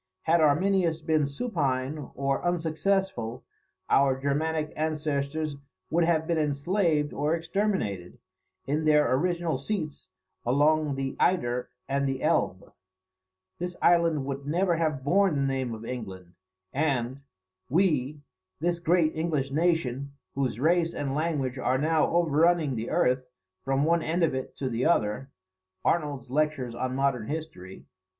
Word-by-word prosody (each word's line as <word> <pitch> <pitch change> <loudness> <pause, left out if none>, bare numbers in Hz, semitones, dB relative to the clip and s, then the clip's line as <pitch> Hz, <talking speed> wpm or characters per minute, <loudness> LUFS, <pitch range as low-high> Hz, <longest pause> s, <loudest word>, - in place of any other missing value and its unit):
Had 165 +1 +3
Arminius 165 +2 +3
been 155 -2 +1
supine 140 - -2
or 135 0 -1
unsuccessful, 175 - -1 0.4
our 135 -1 +3
Germanic 155 +3 -1
ancestors 155 -1 -2 0.3
would 170 +1 +3
have 160 -2 +2
been 165 -1 0
enslaved 150 +1 +1
or 150 +3 +1
exterminated 165 - -2 0.5
in 150 +3 -1
their 150 -4 +4
original 170 0 0
seats 155 -2 -4 0.4
along 145 +3 +2
the 135 0 -3
Eyder 125 -9 +1 0.2
and 140 0 0
the 135 -1 -3
Elbe; - - 0 0.9
this 180 0 -4
island 170 -5 +3
would 140 0 -5
never 170 +2 +1
have 155 -5 -1
borne 185 +3 +3
the 140 - 0
name 135 -3 -1
of 110 +1 -9
England, 95 -8 -7 0.4
and 135 -3 0 0.5
"we, 150 -3 +1 0.4
this 170 +2 0
great 170 -1 +2
English 155 -4 -1
nation, 140 -4 0 0.2
whose 130 -4 -1
race 165 +3 +2
and 140 -2 -2
language 145 -4 -1
are 130 +1 +1
now 155 +2 +2
over 165 -4 +1
running 165 -5 +3
the 115 +1 -4
earth, 125 0 +1 0.4
from 135 +1 +1
one 170 +1 +3
end 170 +3 0
of 165 - +2
it 130 0 -5
to 135 - -2
the 120 0 -1
other," 130 -3 +1 0.6
[Arnold's 145 -6 0
Lectures 150 -4 0
on 130 +2 -3
Modern 135 -5 0
History. 140 - -7
150 Hz, 135 wpm, -27 LUFS, 135-165 Hz, 0.9 s, their